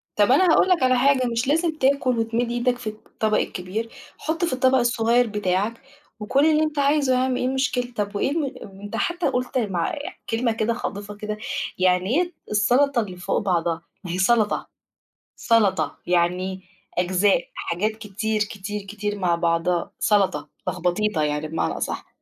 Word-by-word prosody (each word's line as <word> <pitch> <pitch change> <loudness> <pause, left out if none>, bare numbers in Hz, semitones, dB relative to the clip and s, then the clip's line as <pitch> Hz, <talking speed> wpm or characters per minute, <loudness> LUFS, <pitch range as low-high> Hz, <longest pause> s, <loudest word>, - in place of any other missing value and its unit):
طَب 210 +3 +4
أنا 280 +8 +5
هاقول 375 - +4
لك 355 -7 +3
على 255 0 +4
حاجة، 260 0 +3
مش 235 +2 -1
لازم 320 +2 +1
تاكُل 260 -3 +2
وتمِد 230 +1 0
إيدك 240 +1 +1
في 245 -2 -8
الطبق 215 0 -2
الكبير، 205 +5 -3 0.3
حُط 325 +3 -1
في 335 - -2
الطبق 260 +1 +3
الصغير 240 0 +2
بتاعك، 210 +2 -1 0.4
وكُل 255 +7 +2
اللي 310 -1 +4
أنت 310 -1 -2
عايزه 280 -1 +3
يا - - +3
عَم، 255 0 +1
إيه - - -1
المشكلة؟ 255 -2 -1
طَب 205 -1 -2
وإيه 235 - 0
الم 295 -3 -1
ام 195 -1 -12
أنت 205 0 -6
حتّى 350 0 0
قُلت 250 0 -2
مع 190 -8 -1 0.3
كلمة 230 +1 +1
كده 220 +1 0
خاطفة 205 -3 -5
كده، 210 0 -5 0.4
يعني 185 0 +2
إيه 350 0 -3 0.2
السَلَطة 245 +5 +3
اللي 185 -4 -7
فوق 180 - -1
بعضها؟ 170 -4 0 0.2
ما 180 - -5
هي 180 - -2
سَلَطة، 210 +2 +2 0.7
سَلَطة، 195 -10 +2
يعني 180 +2 0 0.4
أجزاء، 185 +1 +2
حاجات 200 +6 -1
كتير، 215 0 -3
كتير، 205 0 -6
كتير 205 +1 -4
مع 175 -2 +2
بعضها، 170 +1 0
سَلَطة، 190 -8 +1 0.2
لخبطيطة 185 0 0
يعني 150 +1 -1
بمعنى 160 +1 -2
أصح. - - -4
215 Hz, 165 wpm, -23 LUFS, 190-255 Hz, 0.7 s, أنا